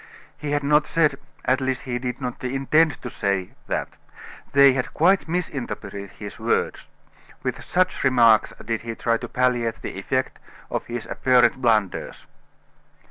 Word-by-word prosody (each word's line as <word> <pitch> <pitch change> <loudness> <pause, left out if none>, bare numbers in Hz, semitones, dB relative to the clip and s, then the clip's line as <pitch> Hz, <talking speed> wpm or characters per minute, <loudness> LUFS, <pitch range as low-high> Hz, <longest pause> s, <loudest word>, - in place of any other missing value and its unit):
He 150 - -6
had 145 0 0
not 150 +1 +3
said 150 -4 +2 0.3
at 130 +1 +2
least, 130 -1 -1
he 125 -1 -3
did 125 0 -4
not 125 -2 -5
intend 135 +5 +2
to 125 - -4
say 100 -2 -1 0.2
that; - - -1 0.6
they 140 -1 +7
had 125 -1 -3
quite 185 +4 +3
misinterpreted 135 - -4
his - - -10
words. - - -1 0.6
With - - -3
such 185 +1 0
remarks 115 -4 +5
did 115 -1 -2
he 115 0 -5
try 115 0 +1
to - - -7
palliate 120 -3 0
the - - -5
effect 130 +6 -2 0.3
of - - -3
his 120 -1 -5
apparent 130 0 +3
blunders. 110 -6 0
130 Hz, 150 wpm, -23 LUFS, 115-140 Hz, 0.6 s, they